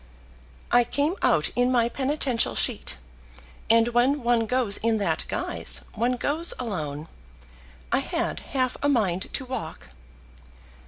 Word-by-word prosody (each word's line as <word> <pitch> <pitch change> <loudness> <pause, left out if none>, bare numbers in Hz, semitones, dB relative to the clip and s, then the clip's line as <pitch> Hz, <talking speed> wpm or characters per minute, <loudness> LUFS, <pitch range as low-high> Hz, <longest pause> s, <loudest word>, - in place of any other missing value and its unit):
"I 245 0 +6
came 285 +8 0
out - - +2
in 245 +1 +2
my 235 -2 +3
penitential 265 -1 0
sheet, - - -1 0.7
and 230 +1 +5
when 250 +3 +2
one 235 -1 +2
goes 245 -4 +2
in 225 0 +1
that 205 - -1
guise, - - 0
one 240 +3 0
goes 300 +7 +1
alone. 155 - -4 0.8
I - - +3
had - - -2
half 255 -2 -2
a 285 - +2
mind 195 -9 0
to 265 - -3
walk." 160 - -6
240 Hz, 130 wpm, -25 LUFS, 220-260 Hz, 0.8 s, I